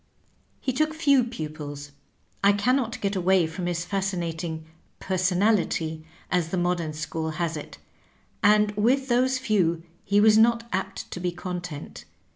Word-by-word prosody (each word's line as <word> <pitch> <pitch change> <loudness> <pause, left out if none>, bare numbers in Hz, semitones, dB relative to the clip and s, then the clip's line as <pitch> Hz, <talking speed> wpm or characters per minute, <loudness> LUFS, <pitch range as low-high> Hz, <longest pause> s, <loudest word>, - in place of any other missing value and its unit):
He 260 - -2
took 310 +4 0
few 280 -5 +4
pupils 150 - -6 0.3
— - - -39
^I 200 0 +5
can 250 +6 +3
not 250 -3 -2
get 200 0 -1
away 185 -1 +3
from 175 +3 -4
his 175 0 -2
fascinating 170 -4 -3 0.2
" - - -40
personality,'^ 180 -4 +1 0.3
as 175 -3 +1
the 185 - -2
modem 175 -2 0
school 160 +1 -3
has 170 -2 -1
it 150 - -8 0.4
— - - -35 0.3
and 210 0 +5
with 250 +6 +1
those 255 +2 +3
few 180 -9 +1 0.2
he 200 +1 +2
was 215 +1 +6
not 230 +1 +3
apt 190 +1 -3
to - - -5
be 180 0 -1
content. 175 -3 -7
185 Hz, 160 wpm, -26 LUFS, 165-220 Hz, 0.4 s, was